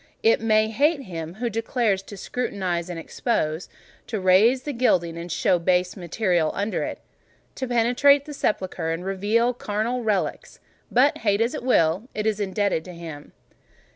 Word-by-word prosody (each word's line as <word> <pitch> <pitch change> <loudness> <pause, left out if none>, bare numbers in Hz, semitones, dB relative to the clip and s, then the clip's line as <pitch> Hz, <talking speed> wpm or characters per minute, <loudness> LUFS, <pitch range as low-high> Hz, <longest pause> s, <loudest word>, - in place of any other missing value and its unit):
It 225 0 +4
may 215 -1 +3
hate 285 +5 +2
him 165 -4 -6
who 240 +3 -2
dares 225 -2 0
to 200 +1 -11
scrutinise 185 -6 -3
and 175 - -5
expose—to 170 +3 -4
rase 205 +8 +4
the 295 - -4
gilding, 180 -9 +1
and 170 +1 -7
show 175 +2 +2
base 180 +1 +1
metal 175 -3 0
under 205 +2 -1
it—to 260 - -8
penetrate 250 +4 +4
the 300 - -7
sepulchre, 185 - -2
and 165 +2 -3
reveal 210 +6 +1
charnel 235 +2 -2
relics: 210 -4 -2 0.3
but 265 +4 +3
hate 205 -2 +1
as 230 +2 +1
it - - -4
will, 205 -2 +2
it 215 - -2
is 215 -1 0
indebted 200 -4 0
to 180 - -9
him. 160 -4 -9
205 Hz, 155 wpm, -24 LUFS, 180-235 Hz, 0.3 s, It